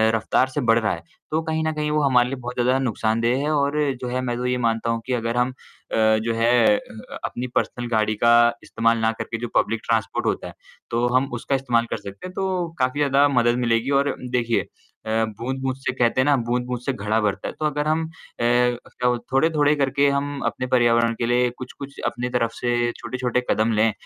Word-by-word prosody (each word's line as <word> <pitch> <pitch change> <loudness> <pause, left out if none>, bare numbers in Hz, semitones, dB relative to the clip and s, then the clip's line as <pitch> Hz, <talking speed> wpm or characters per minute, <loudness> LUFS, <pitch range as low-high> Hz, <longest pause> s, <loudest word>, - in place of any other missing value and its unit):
रफ्तार 115 +4 +2
से 145 +2 -2
बढ़ 115 -2 +4
रहा 110 -2 0
है। - - -7 0.3
तो 155 +1 +1
कहीं 160 0 -2
न 160 - 0
कहीं 150 0 -2
वो 150 0 +2
हमारे 125 -3 +4
लिए 135 - -3
बहुत 125 +1 -5
ज़्यादा 125 +2 +2
नुकसानदेह 115 -1 0
है, 150 - 0
और 145 0 +1 0.2
जो 125 - -3
है, 125 +1 -2
मैं 120 -1 -2
तो 125 - -3
ये 125 0 +1
मानता 115 -1 0
हूँ 115 0 -1
कि 130 - -2
अगर 115 0 -1
हम 125 +1 +2
अ, 130 - -11
जो 110 +1 +2
है 115 +1 +2 0.3
अ - - -3
अ, 250 -1 -11
अपनी 125 +1 -3
पर्सनल 120 -1 -1
गाड़ी 110 -2 +1
का 115 +3 +4 0.3
इस्तेमाल 115 0 +1
ना 110 0 +1
करके 115 - -4
जो 120 - -3
पब्लिक 115 - +2
ट्रांसपोर्ट 115 -1 0
होता - - -1
है, - - -10 0.4
तो 120 +1 +1
हम 135 +2 +2
उसका 120 +3 -1
इस्तेमाल 120 -3 +1
कर - - -1
सकते 100 - -9
हैं। 185 - -10
तो 185 -2 -1
काफ़ी 130 +2 0
ज़्यादा 140 0 +4
मदद 120 -3 +2
मिलेगी 115 +2 +1
और 140 +1 0 0.2
देखिए 120 -2 +1 0.4
अ, 110 +1 +1
बूँद-बूँद 130 +2 -2
से 135 -1 -2
कहते 125 0 +2
हैं - - +1
ना, 145 -1 +4
बूँद-बूँद 125 +1 -2
से 135 - 0
घड़ा 110 -1 0
भरता 105 -2 -1
है, - - -5
तो 155 - -1
अगर 150 0 -1
हम 160 +1 +1
अ, 160 - -10 0.3
क्या 125 +1 +1
बोलते 120 -1 -2
थोड़े-थोड़े 150 +1 +3
करके 140 0 +2
हम 140 0 -2
अपने 130 - -2
पर्यावरण 120 -2 +3
के 120 - 0
लिए 120 +1 +2
कुछ-कुछ 135 +2 -9
अपनी 125 +1 -2
तरफ 115 -2 0
से, 120 -1 0
छोटे-छोटे 125 +1 -2
कदम 110 +2 +2
लें, 110 +1 +3
125 Hz, 220 wpm, -23 LUFS, 115-140 Hz, 0.4 s, बढ़